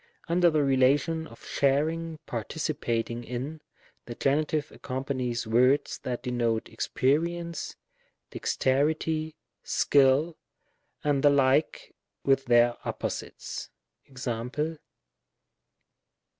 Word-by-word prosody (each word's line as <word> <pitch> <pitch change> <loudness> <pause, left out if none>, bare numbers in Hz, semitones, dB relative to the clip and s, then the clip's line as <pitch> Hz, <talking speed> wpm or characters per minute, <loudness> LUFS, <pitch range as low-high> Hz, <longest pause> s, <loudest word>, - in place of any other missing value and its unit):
Under 175 +1 +4
the 155 -2 +2
relation 140 +5 +2
of - - -15
sharing, 155 +4 0
participating 120 -2 -2
in, 130 +6 -5 0.5
the 120 - -6
Gen. 140 +5 +2 0.3
accompanies 130 -3 -3
words 125 +5 +3
that 125 -1 -4
denote 120 -3 0
experience, 170 +9 -1 0.6
dexterity, 155 +3 0 0.3
skill, 140 +4 +3 0.6
and 145 -2 +2
the 145 - +6
like, 140 +1 +2 0.3
with 135 -1 +2
their 120 0 +4
opposites. - - -5 0.4
Mc. 130 +5 -3
135 Hz, 85 wpm, -28 LUFS, 125-155 Hz, 0.6 s, the